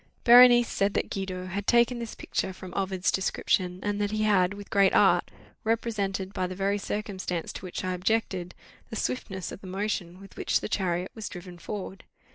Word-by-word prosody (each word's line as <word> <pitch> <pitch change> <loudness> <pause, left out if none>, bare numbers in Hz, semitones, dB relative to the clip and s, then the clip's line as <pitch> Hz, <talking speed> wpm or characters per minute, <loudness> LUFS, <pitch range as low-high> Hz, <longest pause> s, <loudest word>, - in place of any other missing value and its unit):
Berenice 240 0 +8
said 200 0 0
that - - -1
Guido 185 -2 -4
had 195 +2 -4
taken 240 0 +4
this 230 -2 -6
picture 190 - -3
from 185 -1 -10
Ovid's 190 -1 0
description, 185 -1 0
and 205 0 -1
that 205 - +1
he 215 +1 -1
had, 200 -2 +3
with 205 0 -11
great 195 -1 +4
art, - - +4 0.3
represented, 205 -4 -1
by 185 -2 -1
the 185 - -6
very 200 +2 0
circumstance 190 -4 -4
to - - -7
which 180 - -5
I 185 0 -1
objected, 180 -1 -1 0.3
the 225 - -6
swiftness 195 -5 -3
of - - -9
the 190 - -10
motion 185 -2 -3
with 195 0 -14
which - - +1
the - - -5
chariot 180 -3 -1
was 220 -2 -6
driven 175 -1 -10
forward. 195 0 -6
195 Hz, 190 wpm, -27 LUFS, 185-215 Hz, 0.3 s, Berenice